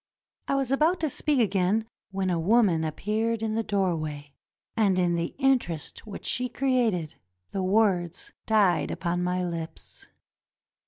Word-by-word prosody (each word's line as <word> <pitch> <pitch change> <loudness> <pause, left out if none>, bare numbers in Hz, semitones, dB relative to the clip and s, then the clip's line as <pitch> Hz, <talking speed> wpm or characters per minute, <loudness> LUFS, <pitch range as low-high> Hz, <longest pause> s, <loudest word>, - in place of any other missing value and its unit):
I - - +1
was 270 -2 0
about 315 +6 +3
to 315 - +1
speak 290 +1 0
again 205 0 +2 0.2
when 190 -1 -1
a 170 - 0
woman 185 -3 +3
appeared 215 +8 -1
in 220 -1 -1
the 225 - +1
doorway, 155 -9 -2 0.4
and 205 -5 +3
in 175 -1 +2
the 170 0 -2
interest 250 - 0
which 205 - -8
she 250 0 -1
created 240 - 0 0.4
the 195 - -2
words 185 -3 +1 0.2
died 205 -6 +3
upon 175 0 -2
my 180 +1 0
lips. 165 -2 -7
195 Hz, 145 wpm, -27 LUFS, 175-230 Hz, 0.4 s, about